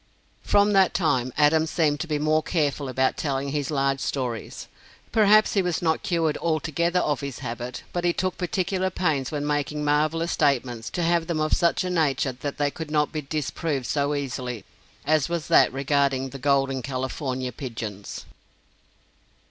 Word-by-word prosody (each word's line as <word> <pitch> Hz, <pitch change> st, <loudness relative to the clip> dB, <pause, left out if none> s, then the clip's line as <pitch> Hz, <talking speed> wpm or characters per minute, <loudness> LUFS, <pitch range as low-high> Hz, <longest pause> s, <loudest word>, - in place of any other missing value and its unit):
From 205 Hz, 0 st, +3 dB
that 195 Hz, -1 st, +4 dB
time, 130 Hz, -8 st, +1 dB
Adams 155 Hz, +2 st, +4 dB
seemed 150 Hz, -4 st, +1 dB
to 175 Hz, -, -3 dB
be 150 Hz, -2 st, 0 dB
more 155 Hz, +1 st, +2 dB
careful 145 Hz, -4 st, -1 dB
about 130 Hz, +1 st, +1 dB
telling 140 Hz, -2 st, -2 dB
his 145 Hz, -1 st, -2 dB
large 135 Hz, -2 st, +1 dB
stories. 125 Hz, -5 st, -4 dB, 0.4 s
Perhaps 215 Hz, 0 st, +5 dB
he 200 Hz, -, +3 dB
was 180 Hz, -3 st, -1 dB
not 160 Hz, -2 st, +1 dB
cured 165 Hz, -3 st, 0 dB
altogether 170 Hz, +2 st, 0 dB
of 145 Hz, -3 st, 0 dB
his 140 Hz, -3 st, -5 dB
habit, 120 Hz, +1 st, -5 dB
but 175 Hz, -, -2 dB
he 175 Hz, -, +3 dB
took 185 Hz, +2 st, -2 dB
particular 185 Hz, +1 st, -1 dB
pains 155 Hz, -8 st, 0 dB
when 145 Hz, -1 st, -2 dB
making 150 Hz, 0 st, -1 dB
marvelous 155 Hz, +3 st, +1 dB
statements 125 Hz, -6 st, 0 dB
to 175 Hz, -, -2 dB
have 170 Hz, -1 st, +1 dB
them 170 Hz, -3 st, -1 dB
of 155 Hz, 0 st, +1 dB
such 170 Hz, +1 st, +2 dB
a 180 Hz, -, -2 dB
nature 150 Hz, -4 st, +1 dB
that 135 Hz, +3 st, -6 dB
they 145 Hz, -1 st, +1 dB
could 160 Hz, 0 st, -7 dB
not 150 Hz, -1 st, +1 dB
be 155 Hz, -, -3 dB
disproved 150 Hz, -1 st, -3 dB
so 145 Hz, +2 st, 0 dB
easily 125 Hz, -4 st, -4 dB, 0.4 s
as 155 Hz, -1 st, +2 dB
was 170 Hz, -2 st, -2 dB
that -, -, +6 dB
regarding 135 Hz, -1 st, +1 dB
the 135 Hz, -, -9 dB
"Golden 135 Hz, -1 st, +1 dB
California 130 Hz, 0 st, -3 dB
Pigeons." 110 Hz, -6 st, -6 dB
150 Hz, 170 wpm, -25 LUFS, 135-165 Hz, 0.4 s, that